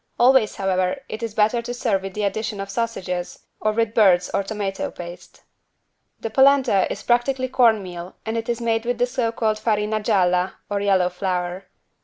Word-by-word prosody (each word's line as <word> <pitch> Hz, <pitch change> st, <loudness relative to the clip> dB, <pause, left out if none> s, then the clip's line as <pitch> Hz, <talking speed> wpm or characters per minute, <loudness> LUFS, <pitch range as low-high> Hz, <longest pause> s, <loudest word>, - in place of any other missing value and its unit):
Always, 250 Hz, -3 st, +4 dB
however, 185 Hz, -1 st, 0 dB
it 215 Hz, -, -6 dB
is 225 Hz, -2 st, -4 dB
better 220 Hz, +2 st, +2 dB
to 240 Hz, +1 st, -5 dB
serve 220 Hz, -6 st, 0 dB
with 195 Hz, -1 st, -7 dB
the 210 Hz, -, -2 dB
addition 210 Hz, +1 st, -2 dB
of 195 Hz, 0 st, -5 dB
sausages, 190 Hz, -5 st, -3 dB
or 215 Hz, -, +1 dB
with 225 Hz, 0 st, 0 dB
birds 185 Hz, -6 st, +4 dB
or -, -, +2 dB
tomato 200 Hz, -1 st, -3 dB
paste. 175 Hz, 0 st, -11 dB, 0.8 s
The 225 Hz, -, -5 dB
=polenta= 265 Hz, -6 st, +4 dB
is -, -, -5 dB
practically 255 Hz, +2 st, +1 dB
cornmeal 195 Hz, -8 st, +1 dB
and 220 Hz, 0 st, -2 dB
it 230 Hz, +1 st, -3 dB
is 235 Hz, 0 st, -1 dB
made 225 Hz, -1 st, 0 dB
with 245 Hz, 0 st, -1 dB
the 245 Hz, -, +2 dB
so 245 Hz, -2 st, -1 dB
called 220 Hz, -2 st, -1 dB
=farina 215 Hz, -1 st, 0 dB
gialla= 185 Hz, -4 st, +2 dB, 0.2 s
or 200 Hz, 0 st, 0 dB
yellow 190 Hz, -3 st, +3 dB
flour. 180 Hz, 0 st, -3 dB
215 Hz, 180 wpm, -22 LUFS, 190-230 Hz, 0.8 s, Always